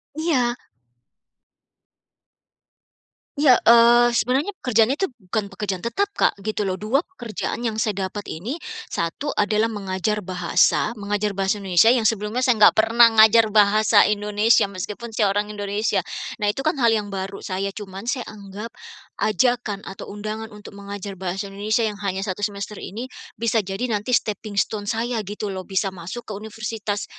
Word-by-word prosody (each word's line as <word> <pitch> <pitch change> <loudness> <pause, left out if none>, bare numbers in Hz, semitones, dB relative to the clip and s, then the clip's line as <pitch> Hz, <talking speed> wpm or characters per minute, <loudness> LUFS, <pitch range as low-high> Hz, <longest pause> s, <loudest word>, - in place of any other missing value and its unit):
Iya. 265 -7 +1 2.8
Iya, 285 -3 +6 0.2
eee, 235 +1 +7
sebenarnya 260 - +1
pekerjaannya 245 +3 +2
itu 385 - +1
bukan 210 -2 -3
pekerjaan 195 -1 -4
tetap 395 +12 0
Kak, - - +3
gitu 215 0 -2
lho. 190 - -1
2 220 - 0
pekerjaan 240 - -5
yang 225 -3 -2
saya 200 -3 -1
dapat 205 +1 -7
ini, 220 - -5 0.3
1 170 - -3
adalah 215 +2 +1
mengajar 205 0 -2
bahasa, 180 +2 +2
mengajar 205 0 -2
bahasa 195 +1 0
Indonesia 195 +5 +5
yang 250 - +2
sebelumnya 220 +2 0
saya 250 -3 +3
nggak 210 - +7
pernah 230 +1 +5
ngajar 220 0 +6
bahasa 210 0 +5
Indonesia, 210 +1 +3
meskipun 200 +4 -7
saya 210 -2 +2
orang 210 +1 -1
Indonesia. 205 +1 -1 0.4
Nah 205 - +2
itu 270 +6 -3
kan 310 -4 0
hal 235 - +5
yang 210 -2 -1
baru, 195 +1 -4
saya 195 +1 -2
cuman 195 +2 -7
saya 250 -2 -2
anggap 210 +2 -9 0.5
ajakan 215 0 +1
atau 195 - -8
undangan 215 +2 -6
untuk 210 -1 -12
mengajar 200 0 -7
bahasa 190 +1 -4
Indonesia 215 +3 0
yang 210 -1 -3
hanya 195 -1 -2
1 195 0 -4
semester 205 0 -4
ini, 230 +6 -6 0.3
bisa 230 -1 +1
jadi 195 +5 -4
nanti 230 +2 +1
stepping 210 -1 -5
stone 205 0 -1
saya 230 +1 -1
gitu 205 0 -5
lho. 185 - -4
Bisa 190 0 -2
masuk 185 +7 -7
ke 215 - -6
universitas, 215 0 -4
210 Hz, 155 wpm, -22 LUFS, 200-230 Hz, 2.8 s, eee